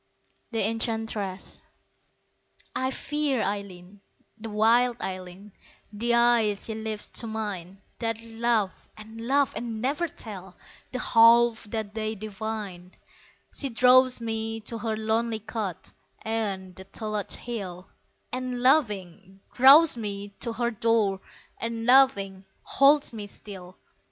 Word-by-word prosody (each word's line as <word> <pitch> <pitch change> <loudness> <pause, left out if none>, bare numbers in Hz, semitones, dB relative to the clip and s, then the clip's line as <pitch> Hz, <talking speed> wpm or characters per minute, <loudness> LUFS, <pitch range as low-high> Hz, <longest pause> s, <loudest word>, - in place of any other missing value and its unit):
The 225 -3 +1
Enchantress 225 -4 -2 1.1
I 260 - 0
FEAR 290 -2 -1
Eileen, 200 -1 -5 0.3
the 225 0 -8
wild 230 +3 +3
Eileen 185 +2 -7 0.4
The 235 +3 +1
eyes 235 -4 +3
she 220 - -4
lifts 220 -1 -5
to 230 - -5
mine, 200 -4 -5 0.2
That 225 -1 -1
laugh 225 -3 -1
and 220 +2 -9
laugh 280 0 +2
and 230 -2 -4
never 285 +8 0
tell 195 - -10 0.3
The 255 - -3
half 230 -1 +5
that 215 -1 -4
they 220 0 -3
divine! 210 -3 -6 0.6
She 275 - 0
draws 255 +1 +5
me 225 -1 -3
to 225 +2 -4
her 220 0 -2
lonely 220 +1 0
cot 210 -4 -5 0.3
Ayont 200 -5 -3
the 190 - -9
Tulloch 210 0 -4
Hill; 190 -7 -6 0.5
And, 250 -1 -4
laughing, 195 - +1
draws 275 +3 +7
me 205 -2 -5
to 235 -2 -3
her 235 0 -1
door 220 -4 +1 0.4
And, 230 0 -3
laughing, 200 -7 +4 0.2
holds 285 -1 +4
me 210 -2 -6
still. 185 -3 -10
220 Hz, 120 wpm, -26 LUFS, 200-235 Hz, 1.1 s, draws